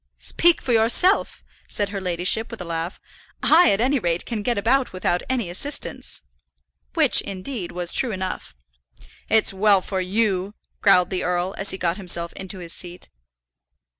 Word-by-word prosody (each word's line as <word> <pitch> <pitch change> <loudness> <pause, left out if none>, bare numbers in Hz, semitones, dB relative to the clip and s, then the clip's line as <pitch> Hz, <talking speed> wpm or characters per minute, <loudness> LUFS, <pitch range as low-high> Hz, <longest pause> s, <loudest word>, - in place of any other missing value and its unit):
"Speak 345 -1 +2
for 245 - 0
yourself," 235 - +2 0.3
said 205 -1 -1
her 200 -1 -4
ladyship, 180 +5 0
with 230 - -8
a 180 - -6
laugh. 165 +2 -4 0.4
"I, 340 +3 +6
at 195 - +2
any 265 +4 +2
rate, 170 -4 -1
can 225 -3 -3
get 240 +1 -1
about 250 +4 +1
without 180 -1 0
any 250 -6 0
assistance," 280 +12 -3 0.7
which, - - +4
indeed, 195 0 -5
was 175 -1 -1
true 255 - +2
enough. 185 - -5 0.7
"It's 220 -2 +4
well 200 0 +4
for 190 0 -3
you!" 195 0 0 0.3
growled 185 -3 +4
the 185 - -2
earl, 180 +1 -1
as 195 0 -1
he 190 - 0
got 170 -1 -1
himself 175 -3 0
into 190 0 -7
his 170 -2 -5
seat. 175 0 -6
195 Hz, 165 wpm, -23 LUFS, 180-225 Hz, 0.7 s, I